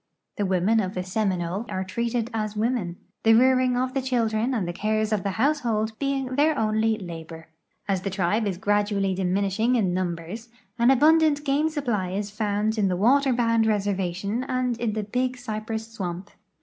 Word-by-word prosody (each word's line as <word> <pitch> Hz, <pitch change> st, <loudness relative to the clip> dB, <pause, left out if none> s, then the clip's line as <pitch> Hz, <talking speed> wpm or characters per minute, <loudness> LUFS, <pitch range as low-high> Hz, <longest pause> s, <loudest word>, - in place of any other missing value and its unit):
The 205 Hz, -, 0 dB
women 190 Hz, +4 st, +2 dB
of 190 Hz, -2 st, -2 dB
the 180 Hz, -, -2 dB
Seminole 185 Hz, +1 st, -2 dB
are 190 Hz, -, -2 dB
treated 235 Hz, +4 st, -2 dB
as 215 Hz, -1 st, -2 dB
women, 215 Hz, -5 st, -1 dB, 0.3 s
the 225 Hz, 0 st, +5 dB
rearing 255 Hz, +1 st, +4 dB
of 255 Hz, +1 st, -1 dB
the 270 Hz, -, 0 dB
children 235 Hz, -2 st, 0 dB
and 215 Hz, -9 st, -1 dB
the 175 Hz, -, -3 dB
cares 215 Hz, +3 st, 0 dB
of 210 Hz, -, +1 dB
the 200 Hz, -, -2 dB
household 230 Hz, -5 st, +1 dB
being 275 Hz, -2 st, -1 dB
their 300 Hz, +1 st, +3 dB
only 220 Hz, 0 st, +1 dB
labor. 165 Hz, -4 st, -9 dB, 0.4 s
As 195 Hz, -2 st, 0 dB
the 195 Hz, -, -3 dB
tribe 195 Hz, +3 st, 0 dB
is 190 Hz, -3 st, -2 dB
gradually 205 Hz, -1 st, +1 dB
diminishing 195 Hz, +5 st, +1 dB
in 195 Hz, -7 st, +1 dB
num 180 Hz, -2 st, -1 dB
bers, 200 Hz, +8 st, -9 dB, 0.3 s
an 235 Hz, +1 st, +5 dB
abundant 300 Hz, +2 st, +4 dB
game 290 Hz, +3 st, +2 dB
supply 235 Hz, -, -2 dB
is 205 Hz, +1 st, -3 dB
found 210 Hz, +1 st, -1 dB
in 200 Hz, -, +3 dB
the 180 Hz, -1 st, 0 dB
water 265 Hz, +7 st, +4 dB
bound 230 Hz, -2 st, +2 dB
reservation 200 Hz, +1 st, -1 dB
and 255 Hz, -2 st, -1 dB
in 235 Hz, -3 st, -1 dB
the 215 Hz, 0 st, -2 dB
Big 250 Hz, +4 st, -1 dB
Cypress 220 Hz, -1 st, -5 dB
swamp. 190 Hz, -3 st, -6 dB
215 Hz, 180 wpm, -25 LUFS, 195-245 Hz, 0.4 s, the